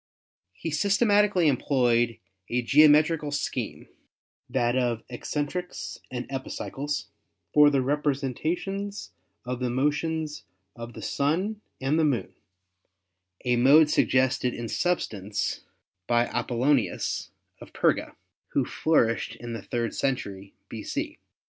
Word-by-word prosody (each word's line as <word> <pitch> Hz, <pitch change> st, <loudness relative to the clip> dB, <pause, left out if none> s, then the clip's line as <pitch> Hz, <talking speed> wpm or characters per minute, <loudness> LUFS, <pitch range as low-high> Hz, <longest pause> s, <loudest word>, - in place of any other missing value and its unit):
He 165 Hz, -, -5 dB
systematically 200 Hz, +1 st, +3 dB
employed 120 Hz, -4 st, +2 dB, 0.3 s
a 125 Hz, +1 st, 0 dB
geometri 150 Hz, +5 st, +6 dB
cal 150 Hz, -, -5 dB
scheme 145 Hz, 0 st, -3 dB, 0.6 s
(that 120 Hz, +1 st, +1 dB
of 120 Hz, -3 st, 0 dB
eccentrics 150 Hz, +8 st, -4 dB
and 125 Hz, -1 st, -4 dB
epicycles) 135 Hz, +1 st, -4 dB, 0.4 s
for 150 Hz, 0 st, +7 dB
the 140 Hz, -2 st, +1 dB
repre 145 Hz, +1 st, +1 dB
sentations 180 Hz, -, -3 dB, 0.3 s
of 125 Hz, 0 st, -3 dB
the 125 Hz, -1 st, -1 dB
motions 150 Hz, +4 st, -1 dB, 0.3 s
of 115 Hz, 0 st, -8 dB
the -, -, -9 dB
Sun 185 Hz, +10 st, 0 dB, 0.2 s
and 135 Hz, +4 st, +1 dB
the -, -, +3 dB
Moon, 130 Hz, -10 st, 0 dB, 1.1 s
a 125 Hz, -1 st, +2 dB
mode 150 Hz, +5 st, +6 dB
suggested 130 Hz, -2 st, +2 dB
in 120 Hz, 0 st, -5 dB
substance 105 Hz, -, -2 dB, 0.4 s
by 120 Hz, 0 st, +3 dB
Apollonius 125 Hz, -5 st, 0 dB, 0.3 s
of -, -, -12 dB
Perga, -, -, +1 dB, 0.4 s
who -, -, +2 dB
flourished 115 Hz, -7 st, +1 dB
in 120 Hz, 0 st, -7 dB
the 115 Hz, -, -5 dB
third 120 Hz, +1 st, -2 dB
century 100 Hz, -7 st, -3 dB
b.c. -, -, -5 dB
135 Hz, 115 wpm, -27 LUFS, 120-155 Hz, 1.1 s, for